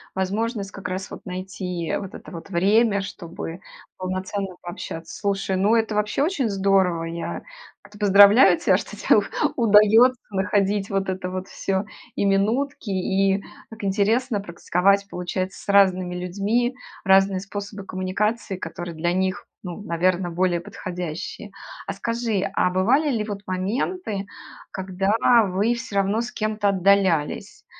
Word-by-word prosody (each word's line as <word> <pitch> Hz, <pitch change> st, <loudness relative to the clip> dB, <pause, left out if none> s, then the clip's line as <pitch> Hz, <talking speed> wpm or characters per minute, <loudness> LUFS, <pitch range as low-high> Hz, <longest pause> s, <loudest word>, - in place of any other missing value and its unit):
возможность 200 Hz, +2 st, -2 dB
как 195 Hz, -, -7 dB
раз 185 Hz, +1 st, -5 dB
вот -, -, -9 dB
найти 180 Hz, -2 st, -4 dB
вот 195 Hz, -2 st, -8 dB
это -, -, -11 dB
вот 170 Hz, +2 st, -9 dB
время, 200 Hz, +3 st, +3 dB
чтобы 170 Hz, -2 st, -7 dB, 0.4 s
полноценно 185 Hz, +1 st, -4 dB
пообщаться. 165 Hz, -1 st, -7 dB
Слушай, 195 Hz, -1 st, -1 dB
ну 205 Hz, +4 st, +3 dB
это 225 Hz, -1 st, +1 dB
вообще 210 Hz, +6 st, 0 dB
очень 290 Hz, -, 0 dB
здорово! 190 Hz, -4 st, +2 dB
Я 165 Hz, 0 st, -5 dB, 0.4 s
кт 205 Hz, 0 st, -16 dB
поздравляю 205 Hz, -, +7 dB
тебя, -, -, +3 dB
что -, -, -7 dB
те -, -, +4 dB, 0.4 s
удается 225 Hz, +2 st, +5 dB
находить 200 Hz, 0 st, 0 dB
вот 195 Hz, -1 st, -1 dB
это 185 Hz, -1 st, -3 dB
вот 185 Hz, +1 st, -5 dB
всё, 195 Hz, +1 st, -2 dB, 0.3 s
и -, -, 0 dB
минутки, 220 Hz, +6 st, 0 dB
и 195 Hz, +1 st, +1 dB, 0.3 s
так 220 Hz, -2 st, -11 dB
интересно 210 Hz, +4 st, +1 dB
практиковать, 195 Hz, +2 st, +1 dB
получается, 185 Hz, 0 st, -4 dB
с -, -, -12 dB
разными 185 Hz, -3 st, +4 dB
людьми 205 Hz, +8 st, -1 dB, 0.3 s
разные 195 Hz, 0 st, +4 dB
способы 200 Hz, +1 st, -7 dB
коммуникации, 195 Hz, +3 st, -2 dB
которые 175 Hz, -2 st, -6 dB
для 175 Hz, +2 st, 0 dB
них, 190 Hz, +2 st, -1 dB, 0.2 s
ну, 180 Hz, +1 st, -6 dB
наверно, 180 Hz, 0 st, 0 dB
более 175 Hz, 0 st, +1 dB
подходящие. 175 Hz, -1 st, -6 dB, 0.4 s
А -, -, -2 dB
скажи, 230 Hz, -4 st, -1 dB
а 180 Hz, -, +2 dB
бывали 235 Hz, +12 st, +2 dB
ли 225 Hz, -4 st, 0 dB
вот 205 Hz, -2 st, -5 dB
моменты, 205 Hz, -, -2 dB, 0.5 s
когда 190 Hz, +1 st, -2 dB, 0.4 s
вы 200 Hz, +5 st, +1 dB
всё 235 Hz, -3 st, -7 dB
равно 200 Hz, +3 st, +2 dB
с 235 Hz, -, -5 dB
кем-то 215 Hz, -1 st, 0 dB
отдалялись? 190 Hz, -5 st, +1 dB
195 Hz, 140 wpm, -23 LUFS, 185-210 Hz, 0.5 s, поздравляю